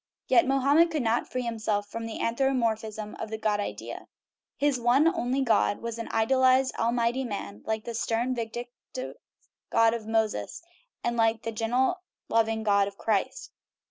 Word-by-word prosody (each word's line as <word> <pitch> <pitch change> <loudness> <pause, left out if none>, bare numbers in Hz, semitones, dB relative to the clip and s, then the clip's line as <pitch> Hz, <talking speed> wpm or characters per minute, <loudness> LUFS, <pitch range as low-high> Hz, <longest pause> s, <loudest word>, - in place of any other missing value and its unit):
Yet 345 - +5
Mohammed 280 +5 +4
could 310 -5 -1
not 230 +1 +1
free 255 0 -2
himself 215 -3 -1
from 230 +2 -5
the 225 - -6
an 230 - 0
thropomorphism 220 -5 -1
of 220 - -4
the 220 - -4
God 215 -1 0
idea. 205 - -5 0.5
His 285 -3 +1
one 245 +6 +4
only 275 -6 +1
God 225 -4 +2
was 235 0 -5
an 230 - -5
idealized, 260 +3 +3
almighty 235 +2 +1
man, 105 - -6
like 220 -1 -1
the 235 - -5
stern, 235 +2 0
vin 230 -2 -3
dictive 245 +2 -7 0.6
God 230 0 +4
of 225 -2 -5
Moses, 220 - -1 0.4
and 240 0 -1
the 225 0 +1
gentle, 250 - 0 0.3
loving 225 -1 +1
God 200 -2 +3
of 200 0 -9
Christ. 220 - -1
230 Hz, 165 wpm, -27 LUFS, 220-255 Hz, 0.6 s, Yet